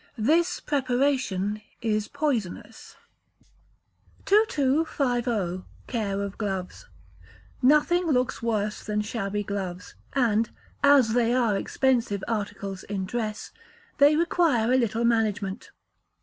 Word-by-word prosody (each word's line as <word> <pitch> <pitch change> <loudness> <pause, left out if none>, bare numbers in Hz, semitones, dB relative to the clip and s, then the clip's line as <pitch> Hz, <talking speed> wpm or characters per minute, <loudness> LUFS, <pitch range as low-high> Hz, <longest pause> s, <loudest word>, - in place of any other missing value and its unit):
This 335 +10 +2
preparation 255 -7 0 0.2
is 215 -2 -1
poisonous. 275 - -3 1.3
2250. 260 - +1 0.2
Care 200 -5 -2
of 200 -1 -6
Gloves. 190 -4 -4 0.7
Nothing 300 +6 +4
looks 255 -5 0
worse 215 -2 -1
than 210 0 -1
shabby 205 -1 -3
gloves; 190 -3 -5 0.2
and, 230 -4 +2 0.3
as 280 -6 +5
they 240 0 +2
are 235 -5 +2
expensive 235 -3 0
articles 200 -3 -4
in 195 -2 -4
dress, 215 0 -4 0.5
they 290 +2 +6
require 310 -8 +2
a - - +5
little 235 -1 0
management. 215 -4 0
230 Hz, 100 wpm, -26 LUFS, 205-270 Hz, 1.3 s, they